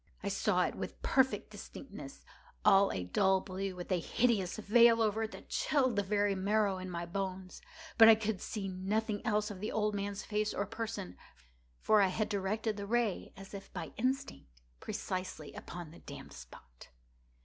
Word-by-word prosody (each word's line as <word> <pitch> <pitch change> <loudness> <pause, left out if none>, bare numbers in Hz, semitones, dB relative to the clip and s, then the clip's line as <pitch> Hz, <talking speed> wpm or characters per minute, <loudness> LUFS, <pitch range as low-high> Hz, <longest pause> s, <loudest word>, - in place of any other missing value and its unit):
I - - -1
saw - - +2
it - - -1
with - - -6
perfect 265 0 +2
distinctness—all 200 - -1
a 90 - -3
dull 190 - +3
blue, 190 0 -4
with 180 +1 -7
a 180 - +3
hideous 215 0 +1
veil 230 +2 +6
over 220 0 +1
it 220 - -8
that - - -11
chilled 260 -6 +1
the 205 - +3
very 205 0 +1
marrow 200 0 +1
in 185 0 -6
my 170 -1 -4
bones; 185 +1 -4 0.4
but 225 0 +11
I 225 - +10
could 215 -2 -2
see 205 -3 -4
nothing 205 +3 -1
else 210 -2 +1
of 195 - -8
the 210 - -3
old 210 -1 0
man's 200 0 -3
face 210 0 -1
or 200 - 0
person: 215 - -5 0.6
for 215 -1 +5
I 195 - +5
had 210 +4 -1
directed 210 +2 -1
the 200 0 -5
ray 230 -3 0
as 195 +1 -11
if 195 -1 -8
by - - -5
instinct, 255 - -3 0.2
precisely 185 - -4
upon 175 -3 -8
the 165 - -13
damned - - -10
spot. - - -13
200 Hz, 175 wpm, -33 LUFS, 185-220 Hz, 0.6 s, but